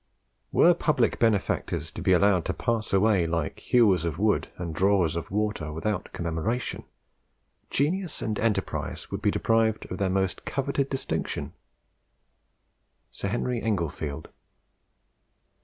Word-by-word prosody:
"Were - - +6
public - - +1
benefactors 110 -4 0
to - - -7
be - - +2
allowed 95 -1 +4
to - - -2
pass 115 -3 -1
away, 100 -3 +3
like 85 0 -2
hewers 105 -9 +3
of 85 -2 -2
wood 105 +2 +2
and 85 -3 -4
drawers 90 -2 +2
of 85 - -4
water, 105 -6 -1
without 95 +5 -3
commemoration, 85 +9 -3 0.8
genius 170 +5 0
and 110 -1 -2
enterprise 110 -2 -2
would - - -3
be - - +3
deprived 115 -1 +1
of 90 - -4
their 100 -1 +1
most 95 0 -1
coveted 140 0 -1
distinction." 135 - -3 1.6
Sir - - -4
Henry 120 +3 -1
Englefield. 80 -7 -2
100 Hz, 125 wpm, -27 LUFS, 85-115 Hz, 1.6 s, Were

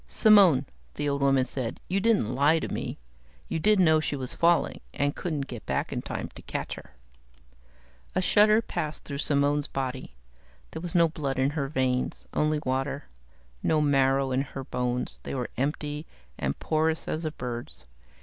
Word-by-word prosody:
"Simone," 195 - +6 0.3
the 145 - -2
old 140 0 0
woman 135 -2 +4
said. 130 -4 -4
"You 190 +2 +1
didn't 205 - +2
lie 145 +5 +4
to - - -2
me? - - -4 0.5
You - - -2
did 210 +4 +4
know 160 -3 +5
she 155 - -2
was 130 -2 -3
falling, 170 0 +2
and 145 0 0
couldn't 160 -6 -2
get 120 -5 -8
back - - -1
in - - -2
time - - -4
to - - -11
catch - - -4
her?" 65 - -12 1.2
A - - +3
shudder 215 +3 +5
passed 155 -6 -4
through 140 -1 -5
Simone's 145 0 +1
body. 130 - -4 0.6
There - - -6
was 175 -1 -5
no 170 -1 +6
blood 145 -4 -3
in 135 +2 +2
her 145 -3 -2
veins, 130 -3 -1
only 150 0 +1
water; 135 +2 -2 0.5
no 155 - +2
marrow 135 -2 +3
in 130 +1 +2
her 135 0 -6
bones, 125 -1 -2
they - - -5
were 125 -2 -3
empty, 150 +3 -2 0.3
and 70 +2 -2
porous 160 0 0
as 155 - -2
a 155 - 0
bird's. 120 - -7
145 Hz, 175 wpm, -27 LUFS, 130-160 Hz, 1.2 s, Simone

